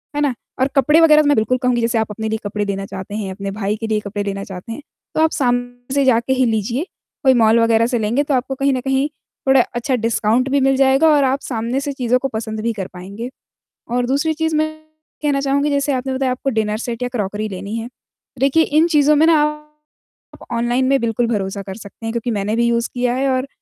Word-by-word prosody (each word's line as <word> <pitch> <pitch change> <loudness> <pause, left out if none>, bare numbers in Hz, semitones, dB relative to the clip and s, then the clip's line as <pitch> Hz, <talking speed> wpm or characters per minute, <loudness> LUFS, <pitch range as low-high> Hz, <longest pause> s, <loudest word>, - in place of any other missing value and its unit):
है 295 - 0
ना? 285 -3 +2 0.3
और 260 - +3
कपड़े 300 +4 +4
वगैरह 305 -2 +7
तो 300 - 0
मैं 290 - +4
बिल्कुल 235 +3 +1
कहूँगी, 250 -2 +1
जैसे 230 +1 +1
आप 220 -1 +1
अपने 220 +1 -4
लिए 220 0 -2
कपड़े 205 0 -2
देना 195 -1 -3
चाहते 195 +1 -7
हैं, 200 -3 -3
अपने 195 +1 -5
भाई 205 0 -2
के 225 - -4
लिए 215 -1 +1
कपड़े 205 0 -4
लेना 195 -1 -4
चाहते 190 +3 -8
हैं, 230 - -6 0.3
तो - - +2
आप 320 0 +3
सामने 245 -1 -2
से 280 -1 +2
जाके 240 0 +3
ही 260 -1 +2
लीजिए, 230 +4 -1 0.4
कोई 265 -2 +6
मॉल 225 +1 +5
वगैरह 230 0 +3
से 240 -1 0
लेंगे, 225 +6 +1
तो 290 - -1
आपको 265 +1 -1
कहीं 275 +1 +1
न 255 - -1
कहीं 270 +2 +1 0.4
थोड़ा 265 -1 +6
अच्छा 245 +2 0
डिस्काउंट 230 +2 +1
भी 280 +1 +2
मिल 270 0 +3
जाएगा 270 +3 +4
और 295 -2 +4
आप 265 +1 +1
सामने 235 +1 -2
से 285 - -3
चीज़ों 250 -1 +1
को 270 - -1
पसंद 220 0 -4
भी 230 +1 -1
कर 195 -4 -5
पाएँगे। 200 +7 -7 0.6
और 245 0 +1
दूसरी 285 +5 +1
चीज़, 320 0 -1
मैं 310 +1 +2 0.5
कहना 290 -2 +1
चाहूँगी, 280 +1 +1
जैसे 280 0 +1
आपने 260 +1 -2
बताया, 260 0 0
आपको 255 +2 -2
डिनर 215 -3 -1
सेट 235 +1 -5
या - - 0
क्रॉकरी 210 -3 -3
लेनी 200 +2 -6
है। 230 0 -4 0.5
देखिए, 275 +5 +4
इन 310 +3 +3
चीज़ों 300 -2 +4
में 305 +2 +5
ना 325 -2 +5 0.9
आप - - -14
ऑनलाइन 240 +2 +1
में 270 +1 +3
बिल्कुल 230 +1 0
भरोसा 200 -3 -2
कर 190 -1 -7
सकते 215 +1 -11
हैं, 225 - -2
क्योंकि 235 +1 -2
मैंने 210 0 -1
भी 235 +1 +2
यूज़ 235 0 0
किया 245 -1 0
है, 270 +2 0
और 260 +1 0
245 Hz, 240 wpm, -19 LUFS, 220-270 Hz, 0.9 s, वगैरह